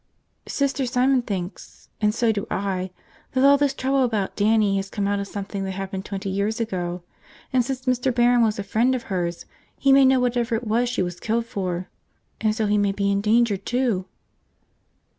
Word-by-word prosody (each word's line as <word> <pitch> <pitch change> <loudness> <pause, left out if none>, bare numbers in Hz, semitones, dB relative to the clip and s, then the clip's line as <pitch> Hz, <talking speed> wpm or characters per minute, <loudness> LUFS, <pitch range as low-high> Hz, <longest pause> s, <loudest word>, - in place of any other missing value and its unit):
"Sister 275 -2 0
Simon 255 +1 +2
thinks 190 -5 -6
– - - -42
and 210 0 +3
so 230 +1 +1
do 210 0 -3
I 190 -2 -2 0.2
– - - -31
that 260 0 +2
all 280 +1 +7
this 280 -1 +1
trouble 270 0 +1
about 215 -6 -1
Dannie 210 -1 +3
has 195 0 -3
come 200 0 -2
out 205 0 0
of 200 - -4
something 200 0 -5
that 190 0 -3
happened 190 0 -5
twenty 200 0 -5
years 200 +4 -1
ago. 180 -5 -3 0.5
And 255 -1 +4
since 260 +1 -4
Mr. 255 0 +1
Barron 240 0 +4
was 220 -2 +2
a 200 - -3
friend 230 +6 +2
of 245 - -4
hers, 175 -2 -2 0.3
he 275 - +3
may 275 0 +7
know 260 0 +5
whatever 240 -1 0
it 230 +2 -3
was 235 +3 +1
she 245 -6 0
was 175 -1 -5
killed 230 +1 -1
for, 185 -5 -3 0.5
and 215 -1 +1
so 220 -1 0
he 210 0 +2
may 200 -1 +2
be 200 0 0
in 200 0 +1
danger, 220 0 +3
too!" 230 -2 -1
220 Hz, 205 wpm, -23 LUFS, 195-245 Hz, 0.5 s, all